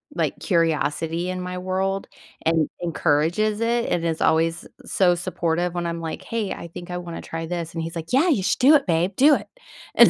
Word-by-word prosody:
like, - - 0
curiosity 165 0 0
in 185 0 -4
my 180 0 -4
world 190 +1 -1 0.4
and 160 -1 +2
encourages 170 +5 +1
it 235 +1 +1
and 170 -1 0
is 160 -1 -1
always 165 +1 +2 0.2
so 180 -2 +3
supportive 175 -1 -1
when 175 -1 -1
I'm 170 0 -3
like, 160 -1 -5
"Hey, 225 -4 -2
I 170 - -8
think 175 +1 -9
I 180 - -2
wanna 170 -1 -6
try 165 0 -5
this." 170 -1 -4
And 165 - -3
he's 165 +1 -6
like, 165 +7 -6
"Yeah. 300 +8 +4
You 225 - +2
should - - +1
do 275 +5 +7
it, 285 - +3
babe. 175 +3 +1
Do 290 +6 +6
it." - - -5 0.5
And - - +9
175 Hz, 210 wpm, -23 LUFS, 165-190 Hz, 0.5 s, And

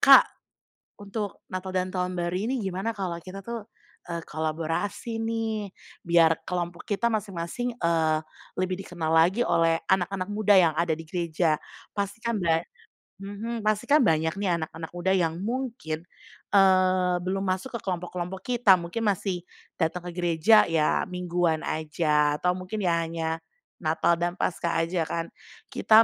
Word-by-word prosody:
"Kak, - - +9 0.8
untuk 205 -1 -5
Natal 185 0 -4
dan 185 0 0
Tahun 180 0 -2
Baru 175 0 -2
ini 235 +5 -1
gimana 190 +3 -2
kalau 185 -3 -2
kita 190 +1 -8
tuh, 235 -2 -5 0.5
eee, 170 - -2
kolaborasi 165 +8 -2
nih, 225 -3 -2 0.3
biar 165 -1 +4
kelompok 175 -1 -3
kita 215 +3 0
masing-masing, 210 +2 -2
eee, 160 -2 +2 0.4
lebih 185 0 0
dikenal 170 -4 -3
lagi 175 +7 +4
oleh 165 -1 +3
anak-anak 190 0 +1
muda 205 0 +3
yang 165 -3 +4
ada 170 +1 +1
di 165 - -9
gereja." 170 -2 +1 0.4
Pastikan 210 +4 -2
ba 165 -5 +2 0.6
mhm, 205 +4 -5
pastikan 215 +8 +3
banyak 160 -4 +2
nih 190 -4 +1
anak-anak 160 +1 -6
muda 175 +2 0
yang 170 -4 +2
mungkin, 225 -10 -3 0.5
eee, 185 -2 +4
belum 190 +2 -2
masuk 210 +7 -3
ke 235 - -2
kelompok-kelompok 180 0 -3
kita 230 -7 +4
mungkin 170 +7 -4
masih 185 -2 -3 0.3
datang 175 +1 -1
ke - - -4
gereja 175 +5 +5
ya 155 -2 +2
mingguan 175 -3 0
aja, 150 -1 +1
atau 180 0 +1
mungkin 185 +4 -5
ya 175 -4 +2
hanya 165 0 -3 0.5
Natal 165 +1 +2
dan 175 +1 -1
Paskah 170 -1 0
aja 175 -1 0
kan, 165 0 -2 0.4
kita 220 +1 +6
180 Hz, 145 wpm, -27 LUFS, 165-200 Hz, 0.8 s, Kak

